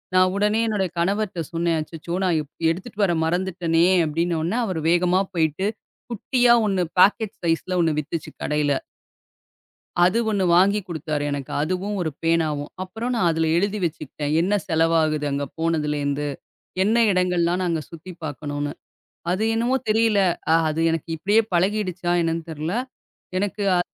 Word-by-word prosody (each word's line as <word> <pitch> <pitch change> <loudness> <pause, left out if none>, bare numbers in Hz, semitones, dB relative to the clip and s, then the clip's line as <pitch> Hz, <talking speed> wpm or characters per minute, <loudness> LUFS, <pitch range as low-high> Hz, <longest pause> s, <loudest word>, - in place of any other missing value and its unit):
நான் 185 0 +5
உடனே 210 +2 +2
என்னோட 205 -3 0
கணவர்ட்ட 190 0 0
சொன்னேன், 170 -1 0
"அச்சச்சோ. 165 +2 -6
நான் 175 -3 +2
எ - - -5 0.3
எடுத்துட்டு 195 +6 -5
வர 185 -3 +3
மறந்துட்டேனே!" 170 -1 +1 0.2
அப்படினோன்னே, 165 +4 -1
அவரு 185 -6 -2
வேகமா 180 +2 +3
போயிட்டு 165 +3 0 0.4
குட்டியா 240 +2 +3
ஒண்ணு 195 -3 +1 0.2
பாக்கெட் 210 +2 +4
சைஸ்ல 170 +2 0
ஒண்ணு 160 -2 +2
வித்துச்சு 155 +2 -5
கடையில. 150 -1 +1 1.3
அது 185 +6 +4
ஒண்ணு 200 -3 +1
வாங்கி 200 +3 +4
குடுத்தாரு 155 -3 -3
எனக்கு, 140 -2 -4
அதுவும் 185 +6 -2
ஒரு 165 - -1
பேனாவும். 155 -3 0
அப்புறம் 225 +7 -4
நான் 190 -7 +2
அதுல 160 0 0
எழுதி 200 +3 0
வச்சுகிட்டேன். 150 -2 -4
என்ன 190 +4 0
செலவாகுது 160 -2 +2
அங்க 140 0 -1
போனதுலேருந்து, 150 -3 -1 0.6
என்ன 215 +4 +2 0.2
இடங்கள்லாம் 180 -1 +1
நாங்க 165 -3 0
சுத்தி 170 +2 -10
பாக்கணும்ன்னு. 145 0 -4 0.6
அது 195 +4 0
என்னவோ 240 +3 +1
தெரியல. 220 -1 +3 0.5
அது 155 +1 -2
எனக்கு 165 -1 -3
இப்படியே 205 +6 +3
பழகிடுச்சா 185 -1 0
என்னன்னு 165 0 -2
தெர்ல. 155 +2 -4 0.7
எனக்கு 205 +1 -2
அ - - +3
175 Hz, 140 wpm, -23 LUFS, 160-195 Hz, 1.3 s, நான்